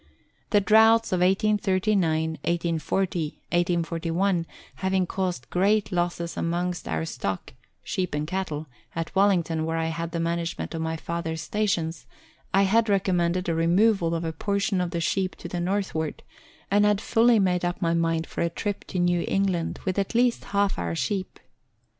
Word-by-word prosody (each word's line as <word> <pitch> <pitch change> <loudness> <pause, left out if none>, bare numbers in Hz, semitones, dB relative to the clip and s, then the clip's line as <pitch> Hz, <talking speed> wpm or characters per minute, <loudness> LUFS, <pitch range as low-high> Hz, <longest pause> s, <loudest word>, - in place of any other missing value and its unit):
The 205 - +4
droughts 220 +2 +5
of 185 - +1
1839, 190 -4 +2
1840, 170 +2 0 0.3
1841 170 +1 0 0.3
having 190 -1 +1
caused 180 -7 -3
great 205 +3 +2
losses 175 -1 -1
amongst 175 +1 -2
our - - -1
stock 100 - -4 0.3
(sheep 180 -5 -2
and 150 +1 -1
cattle) 160 -3 -3 0.3
at 165 -1 -3
Wellington 175 -5 +2
where 165 +1 -1
I 165 0 0
had 165 +1 -3
the 170 - -3
management 170 +1 -2
of 165 - -3
my 160 0 -2
father's 160 0 -4
stations, 170 -6 -1 0.4
I 195 +1 +4
had 220 +3 +3
recommended 180 -2 +1
a 170 - +1
removal 170 +1 +3
of 165 - -2
a 160 - -2
portion 200 +2 0
of 180 - -1
the 170 0 -3
sheep 185 +2 0
to - - -8
the 175 - -4
northward, 175 -4 -2 0.5
and 205 +1 +4
had 210 -1 +3
fully 230 +2 +4
made 180 -3 +2
up 175 0 -1
my 170 -2 +1
mind 165 -1 +1
for - - -5
a 170 - +1
trip 205 +4 -4
to - - -5
New 175 -1 +2
England 190 -4 0
with 185 +1 0
at 195 +4 -2
least 240 0 +2
half 200 0 0
our 85 -1 -2
sheep. 190 - -2
175 Hz, 165 wpm, -26 LUFS, 165-195 Hz, 0.5 s, droughts